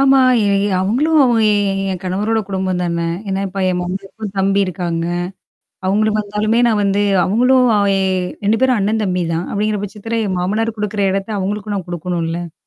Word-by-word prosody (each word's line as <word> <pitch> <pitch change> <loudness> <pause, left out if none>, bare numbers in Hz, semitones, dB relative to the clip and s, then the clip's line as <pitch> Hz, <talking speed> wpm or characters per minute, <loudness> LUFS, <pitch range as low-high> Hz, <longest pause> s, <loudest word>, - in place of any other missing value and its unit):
ஆமா. 270 0 +5 0.3
எ - - +2 0.3
அவுங்களும் 285 +11 +2
அவ 240 -2 +3 0.2
ஏன் 200 -2 +1
ஏன் 185 - -4
கணவரோட 210 +5 0
குடும்பம் 190 -2 -1
தானே! 170 -1 -1 0.2
ஏன்னா 195 0 -1
இப்ப 195 +1 -4
என் 180 -1 0
மம்மிக்கும் 195 +3 -6
தம்பி 195 +1 +2
இருக்காங்க. 170 -2 -3 0.8
அவுங்களும் 215 +2 +2
வந்தாலுமே 210 +3 0
நான் 215 -2 +1
வந்து 200 0 +1 0.2
அவுங்களும் 250 +5 +3
அவ 200 - +2 0.6
2 215 +2 +2
பேரும் 255 -4 +3
அண்ணன் 215 +2 0
தம்பி 180 -2 0
தான். 165 +2 -2
அப்பிடிங்கிற 210 0 -1
பட்சத்தில 225 +3 -4
என் 185 -2 -2
மாமனார் 220 +4 -1
குடுக்குற 210 -1 -2
இடத்த 195 +2 -3
அவுங்களுக்கும் 205 +1 -3
நான் 185 -2 -6
குடுக்கணும் 175 0 -3
இல்ல. 170 0 -5
200 Hz, 170 wpm, -17 LUFS, 185-215 Hz, 0.8 s, ஆமா